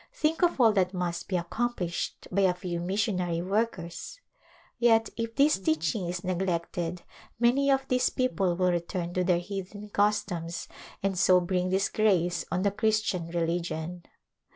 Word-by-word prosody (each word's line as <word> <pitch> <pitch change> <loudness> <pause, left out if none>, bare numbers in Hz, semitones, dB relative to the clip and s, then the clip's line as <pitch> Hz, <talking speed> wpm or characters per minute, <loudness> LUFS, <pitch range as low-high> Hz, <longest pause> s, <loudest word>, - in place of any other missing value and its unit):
Think 320 +2 0
of 350 -5 +2
all 230 -3 +6
that 185 -2 +1
must 175 -1 -2
be 190 - -2
accom 235 +8 -1
plished 175 -1 -4
by 200 +2 +2
a 185 -2 +3
few 180 -2 -4
missionary 180 -2 -1
workers! 190 - -2 0.6
Yet 225 -2 +4
if 230 0 -4
this 285 -4 +4
teaching 165 +2 0
is 175 0 -4
neglected 175 -1 -2 0.4
many 255 +4 +3
of 270 -1 +2
these 255 -1 +2
people 195 -9 0
will 180 0 +2
return 175 0 -2
to 185 - +1
their 180 -1 +3
heathen 200 +3 -6
customs 180 -5 -1 0.4
and 195 -2 0
so 185 -1 +6
bring 180 0 -1
disgrace 185 -3 +1
on 180 +2 0
the 200 - +2
Christian 215 -4 0
religion. 170 0 -2
185 Hz, 155 wpm, -28 LUFS, 175-215 Hz, 0.6 s, all